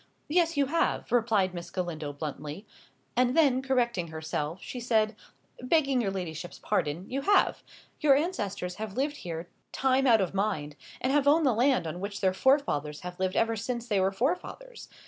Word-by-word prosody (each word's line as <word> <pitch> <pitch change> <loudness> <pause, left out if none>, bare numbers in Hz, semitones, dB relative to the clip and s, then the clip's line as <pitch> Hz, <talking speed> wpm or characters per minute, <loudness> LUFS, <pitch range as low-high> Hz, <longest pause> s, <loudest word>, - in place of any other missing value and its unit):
"Yes, 330 0 +2
you 280 - +4
have," 330 +5 0
replied 220 -6 +2
Miss 170 -1 -7
Galindo, 165 -5 -4
bluntly. 150 +5 -6 0.5
And 250 +3 +2
then, 275 -5 +4
correcting 240 -9 0
herself, 160 +1 -4
she 250 - -7
said, 220 -3 +1 0.5
"Begging 275 -1 +2
your 205 - 0
ladyship's 175 -3 -5
pardon, 155 +6 -1
you 270 +2 -2
have. 405 +8 +3 0.4
Your 285 -3 +5
ancestors 205 - -2
have 215 0 -6
lived 290 +2 0
here 170 -1 -6 0.2
time 265 0 +2
out 230 -3 +6
of 190 -2 -1
mind, 190 -8 -1 0.3
and 260 +2 +1
have 285 -1 +3
owned 310 +2 +5
the 260 - +4
land 250 -2 +2
on 160 +2 -4
which 200 +1 -5
their 190 -1 +2
forefathers 185 - +1
have 180 0 -8
lived 185 0 0
ever 225 0 +2
since 235 +2 -4
there 205 -4 +2
were 190 +1 +2
forefathers. 360 - -3
220 Hz, 175 wpm, -28 LUFS, 180-270 Hz, 0.5 s, out